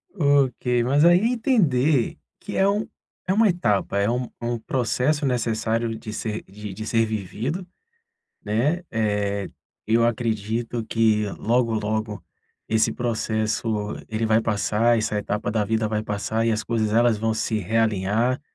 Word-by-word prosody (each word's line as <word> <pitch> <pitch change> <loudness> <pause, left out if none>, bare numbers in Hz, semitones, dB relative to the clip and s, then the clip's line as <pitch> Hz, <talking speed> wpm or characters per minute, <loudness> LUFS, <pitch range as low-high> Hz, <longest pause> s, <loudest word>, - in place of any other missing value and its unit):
Ok, 135 - +2
mas 140 +5 +3
aí 175 +1 +7
entender 155 - +2 0.2
que - - -6
é 195 - +4
um 205 +2 +1
que 185 - -9
é - - +3
uma 220 +1 +4
etapa 105 - 0
é 100 +1 +2
um 120 -1 -3
processo 135 +4 0
necessário 115 -2 0
de 110 - -8
ser 110 0 -4
de 105 +1 -9
de 110 +3 -6
ser 115 0 +2
vivido, 110 - -4 0.8
né? 125 +12 0
Eh, 105 -3 -1 0.4
eu 115 +1 +3
acredito 115 0 -2
que 110 -1 +2
logo, 115 +1 +1
logo 110 -1 -2 0.5
esse 110 0 +2
processo, 110 -3 -1 0.4
ele 110 +1 -2
vai 110 0 +3
passar, 110 +2 +2
essa 105 -1 -1
etapa 105 0 -2
da 110 -1 0
vida 110 +1 0
vai 105 0 -1
passar 110 +2 -1
e 115 - +3
as 110 - -1
coisas 110 -2 -1
elas 115 0 +4
vão 110 +1 0
se 110 0 -1
realinhar, 110 +3 +1
115 Hz, 150 wpm, -23 LUFS, 110-125 Hz, 0.8 s, aí